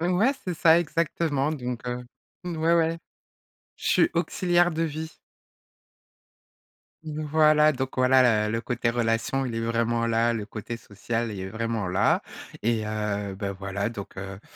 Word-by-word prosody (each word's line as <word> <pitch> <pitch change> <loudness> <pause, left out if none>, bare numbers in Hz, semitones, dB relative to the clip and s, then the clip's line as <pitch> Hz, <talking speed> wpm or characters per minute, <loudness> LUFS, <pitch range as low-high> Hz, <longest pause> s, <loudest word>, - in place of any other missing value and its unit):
Ouais, 180 +10 +3
c'est 180 - -2
ça 165 +1 +5
exactement, 155 -3 0
donc 125 -4 -5
heu 125 0 -4 0.4
ouais, 165 -1 +1
ouais. 165 0 +2 0.8
Je - - -3
suis - - +4
auxiliaire 175 0 +2
de 160 - -1
vie. 160 0 -3 1.9
Voilà, 155 0 +3
donc 130 -1 -3
voilà 125 -4 +4
le 105 - -2
le 115 - 0
côté 120 -1 -1
relation, 120 +3 0
il 115 - -4
est 115 - -1
vraiment 115 0 0
là, 115 +1 +2
le 110 -3 -3
côté 110 +2 -6
social, 115 +2 -4
il 100 - -6
est 95 - -4
vraiment 110 -1 -2
là, 95 +3 +2 0.4
et 110 -1 +1
heu, 105 -2 -3
beh 100 0 -3
voilà 100 +2 -3
donc 100 -5 -8
heu, 95 0 -7
120 Hz, 155 wpm, -26 LUFS, 110-155 Hz, 1.9 s, ça